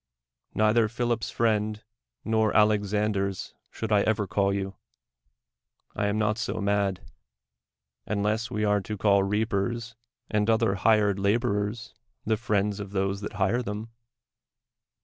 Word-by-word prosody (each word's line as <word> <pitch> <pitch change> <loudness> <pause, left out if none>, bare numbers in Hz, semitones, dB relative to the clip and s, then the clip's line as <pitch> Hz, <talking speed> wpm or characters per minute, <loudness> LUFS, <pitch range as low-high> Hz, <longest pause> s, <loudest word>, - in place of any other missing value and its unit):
Neither 110 +2 +3
Philip's 120 0 -1
friend 110 -1 0 0.4
nor 110 -1 +2
Alexander's 105 -2 +1 0.2
should 110 -1 -5
I 105 -1 +5
ever 105 0 +1
call 100 +1 +1
you; 95 0 -3 1.2
I 105 - 0
am 105 +1 0
not 105 +1 +1
so 110 - -2
mad 100 -2 0 0.5
— 65 +1 -61
unless 105 +3 0
we 105 -3 -1
are 105 -1 +2
to 105 +2 -5
call 100 0 +4
reapers 110 +3 -1 0.3
and 105 0 0
other 110 -3 +3
hired 105 0 +3
laborers 105 +1 0 0.3
the 110 - +2
friends 105 -2 0
of 100 -1 -7
those 95 0 -1
that 105 - -5
hire 105 +4 +1
them. 110 0 -5
105 Hz, 130 wpm, -27 LUFS, 100-110 Hz, 1.2 s, I